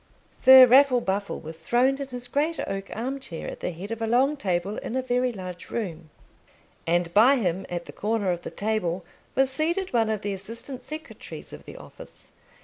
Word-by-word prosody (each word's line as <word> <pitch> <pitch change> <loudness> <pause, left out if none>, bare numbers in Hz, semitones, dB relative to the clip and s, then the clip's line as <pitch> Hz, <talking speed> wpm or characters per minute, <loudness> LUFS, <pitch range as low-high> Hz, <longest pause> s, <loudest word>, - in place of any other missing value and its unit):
Sir 260 0 +9
Raffle 255 0 +6
Buffle 200 -1 -2
was 160 +1 -9
throned 250 - +2
in 275 - -4
his 245 -1 -7
great 300 +2 -1
oak 195 0 -4
arm 260 +5 -3
chair 170 -11 -7
at - - -7
the - - -2
head 180 +5 -8
of 230 0 -4
a 225 - 0
long 260 +6 +3
table 190 -4 -2
in 235 - -5
a 260 - +1
very 250 0 +1
large 185 -4 -8
room; 170 -8 -5 0.8
and 170 0 +1
by 235 +8 +6
him, 190 -6 -1
at 175 -1 -4
the - - -11
corner 210 -3 0
of 175 -1 -3
the - - -6
table, 190 -5 -2 0.3
was 265 0 +3
seated 335 +6 -1
one 225 -2 +2
of 215 -2 -1
the 205 -1 -2
assistant 230 +7 -6
secretaries 310 +2 -9
of - - -11
the - - -10
office. - - -13
225 Hz, 200 wpm, -26 LUFS, 185-260 Hz, 0.8 s, Sir